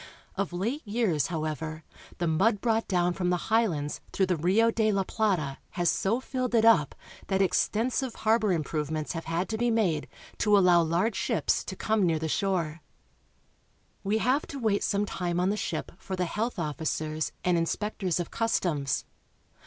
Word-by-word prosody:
Of 195 -1 -2
late 220 +12 -2
years, 205 - 0
however, 155 -1 -4 0.3
the 175 - -1
mud 195 +7 +2
brought 225 0 +1
down 180 -2 +1
from 180 -1 -1
the 180 - +2
highlands 175 -11 +1
through 190 - +2
the 185 -1 +1
Rio 195 +8 +3
de 220 -1 +2
la 195 -1 +1
Plata 185 -10 -1 0.2
has 175 -1 +3
so 220 +6 0
filled 255 -2 -2
it 225 -1 +4
up 195 -11 +5 0.3
that 190 -1 +1
extensive 230 +6 +1
harbor 220 -1 +2
improvements 155 -2 -2
have 165 -2 -5
had 165 +3 -1
to 220 -1 -3
be 240 0 +2
made 195 -10 +1 0.3
to 210 -1 +4
allow 180 -3 +5
large 170 +7 +1
ships - - 0
to - - -5
come 220 -2 +1
near 165 -3 +2
the 160 +1 -2
shore. 170 -3 -1 1.2
We 205 +2 +1
have 255 +6 +1
to 280 - -7
wait 220 -5 +1
some 205 0 +1
time 175 -3 -2
on 185 +2 +2
the - - 0
ship 170 -6 -3
for 190 - -5
the 180 -1 0
health 220 +7 -2
officers 155 -1 -2
and 180 -1 +2
inspectors 180 +1 -1
of 175 - -4
customs. 170 - 0
185 Hz, 175 wpm, -28 LUFS, 165-220 Hz, 1.2 s, up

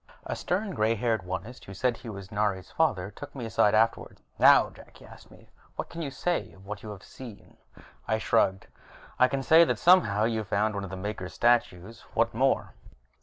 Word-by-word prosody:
A - - -3
stern 195 +3 -2
gray 110 -7 +1
haired 115 -1 0
Onist 95 +7 -6
who 95 - -10
said 125 +5 0
he 115 0 -10
was 100 -1 -9
Nari's 105 -3 -2
father 105 - 0
took 145 +5 -11
me 125 -4 -5
aside 110 -2 +2
afterwards. 115 +1 0 0.2
"Now, - - +6
Jak," - - -16
he - - -16
asked - - -15
me, - - -18 0.3
"what - - -5
can 170 - -7
you 150 - -3
say 175 +6 -2
of 95 - -18
what 105 0 -7
you 110 - -9
have 100 -2 -9
seen?" 120 -6 -12 0.5
I 110 - +1
shrugged. 95 -2 +1 0.5
"I 125 - +6
can 135 +1 -3
say 160 +4 +7
that - - 0
somehow 140 - +4
you've 110 -2 -1
found 105 +3 0
one 100 -1 -4
of 100 - -6
the 95 - -7
Maker 95 -1 -5
statues. 115 0 0
What - - +1
more?" - - 0
110 Hz, 205 wpm, -27 LUFS, 100-125 Hz, 0.5 s, say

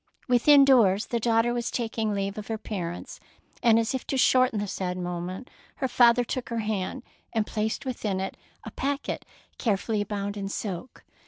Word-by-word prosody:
Within 275 +3 +6
doors 215 -7 +5
the 235 - -1
daughter 230 +1 +2
was 240 -1 -2
tak 230 -2 -3
ing 220 -2 0
leave 200 0 -2
of 210 - -8
her 225 - -2
parents, 175 -5 -5 0.4
and 230 -2 +5
as 230 +2 +1
if 260 - -2
to 270 - -1
shorten 255 -3 +4
the 205 - -1
sad 185 -2 -3
moment, 180 +5 -4 0.3
her 265 - -1
father 245 -1 +5
took 245 +1 -4
her 235 - -2
hand, 215 +4 -3 0.3
and 220 -2 +1
placed 220 +4 -2
within 215 -7 -2
it 190 - -3 0.3
a - - -7
packet 280 +1 -3 0.3
carefully 210 -1 0
bound 205 0 -4
in 195 -1 -3
silk. 200 +2 -5
220 Hz, 180 wpm, -27 LUFS, 200-245 Hz, 0.4 s, Within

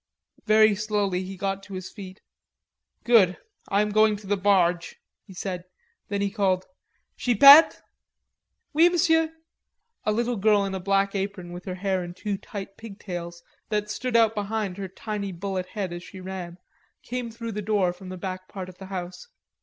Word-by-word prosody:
Very 215 0 +6
slowly 205 -3 -1
he 190 +1 -7
got 195 +1 -2
to 195 -1 -9
his 185 0 -7
feet. 195 -2 -10 0.8
"Good. 210 -7 +5 0.3
I 200 +1 +3
am 210 - -2
going 215 0 +4
to 205 0 -11
the 205 +1 +1
barge," 185 -3 +1 0.3
he 190 - -12
said. 180 -1 -4 0.4
Then 200 -1 -2
he 200 -1 0
called, 190 -3 +1 0.5
"Chipette!" 275 +6 +8 0.9
"Oui, 335 +3 +7
m'sieu." 325 -2 +3 0.7
A 215 - +1
little 235 +2 0
girl 205 0 +3
in 195 - -4
a 190 - -3
black 195 +1 +1
apron 195 -3 -4
with 175 +1 -9
her 185 - -4
hair 190 -1 -1
in 175 0 -8
two 200 0 -3
tight 195 -1 -8
pigtails 175 -5 -7 0.3
that 210 -1 -1
stood 250 +1 -3
out 225 -1 +5
behind 205 -2 -3
her 195 -1 -4
tiny 200 +1 -5
bullet 185 +1 -4
head 190 -3 -4
as 175 - -6
she 190 +2 -11
ran, 185 -2 -7 0.5
came 245 -1 -4
through 230 0 -6
the 210 0 -4
door 200 -4 +1
from 185 +1 -11
the 185 - -6
back 185 0 -6
part 185 -2 -7
of 180 - -15
the 190 - -9
house. 185 - -6
195 Hz, 175 wpm, -25 LUFS, 185-215 Hz, 0.9 s, Chipette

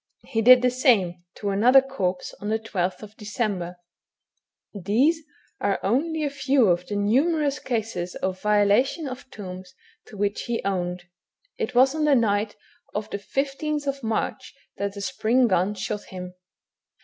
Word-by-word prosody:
He 225 - -1
did 250 +2 +8
the 250 - +4
same 210 - +2
to 200 -1 -3
another 240 +7 +6
corpse 230 -10 -3
on 205 - -3
the 220 - +2
12th 210 -1 -4
December. 200 -5 -3 1.0
These 230 - +2 0.4
are 200 -1 0
only 310 - 0
a 290 - 0
few 270 -5 +3
of 175 0 +1
the 205 - -3
numerous 280 +8 +2
cases 220 -7 -3
of 185 0 -3
violation 210 +9 +2
of 255 0 -8
tombs 185 -2 -9 0.3
to 210 - -12
which 205 +1 -1
he 235 -1 -1
owned. 180 -2 -2 0.6
It 250 - -3
was 265 +2 +5
on 310 -1 0
the 295 -2 +5
night 210 -3 +1 0.4
of 210 0 -3
the 200 - -3
15th 275 +3 -2
March 225 -2 -3 0.2
that 200 0 -2
the 200 - -6
spring 250 +1 +2
gun 190 +1 +1
shot 210 +1 -4
him. 180 -1 -8
215 Hz, 150 wpm, -25 LUFS, 195-265 Hz, 1.0 s, did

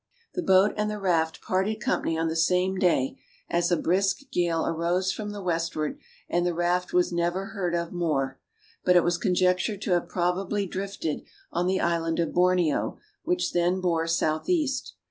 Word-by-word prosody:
The 360 - -2
boat 190 - +4
and 210 0 0
the 210 - -3
raft 165 -5 0
parted 195 +4 0
company 165 -5 0
on 165 0 0
the 160 - -2
same 180 +3 +2
day, 150 -8 +1 0.3
as 170 0 +2
a 175 - +4
brisk 195 - 0
gale 170 -2 +1
arose 175 +3 0
from 210 0 -5
the 205 -1 -6
westward, 165 -3 -2 0.3
and 175 - +1
the 175 -1 0
raft 175 +1 0
was 180 0 +2
never 175 +3 -1
heard 180 -5 -2
of 170 0 -2
more; 150 -7 -1 0.4
but 180 - +4
it 175 - +6
was 175 0 +1
conjectured 180 +3 +1
to - - -2
have 175 -1 +1
probably 190 +3 0
drifted 190 -4 -4 0.3
on 180 - 0
the 190 0 +1
island 165 -1 0
of 170 - 0
Borneo, 180 -4 +2 0.3
which 355 +2 0
then 175 +2 +2
bore 165 -3 0
south 160 - 0
east. 300 -7 0
180 Hz, 180 wpm, -26 LUFS, 170-190 Hz, 0.4 s, it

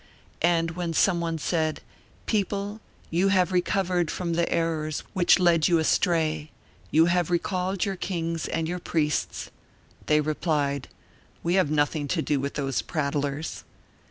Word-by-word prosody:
And 165 -1 +2
when 170 -1 -3
some 175 0 +3
one 165 -1 -1
said: 155 0 -1 0.4
"People, 205 0 -1 0.3
you 175 +4 +2
have 185 -2 +3
recovered 180 -2 +1
from 170 -2 -2
the 170 0 0
errors 155 -2 -1
which 185 -3 +5
led 170 -4 +4
you 170 - +4
astray; 160 -2 +1 0.4
you 160 +1 +5
have 175 -1 +1
recalled 185 +1 0
your 195 -2 -3
kings 165 -3 -2
and 165 -1 -1
your 180 +2 -3
priests," 155 -3 -1 0.6
they 150 0 +4
replied: 145 -3 -1 0.6
"We 170 - +1
have 185 -5 +3
nothing 145 0 +1
to 165 +2 0
do 145 -2 +1
with 140 +1 -3
those 135 -6 -1
prattlers." 145 +1 -2
165 Hz, 145 wpm, -26 LUFS, 155-180 Hz, 0.6 s, which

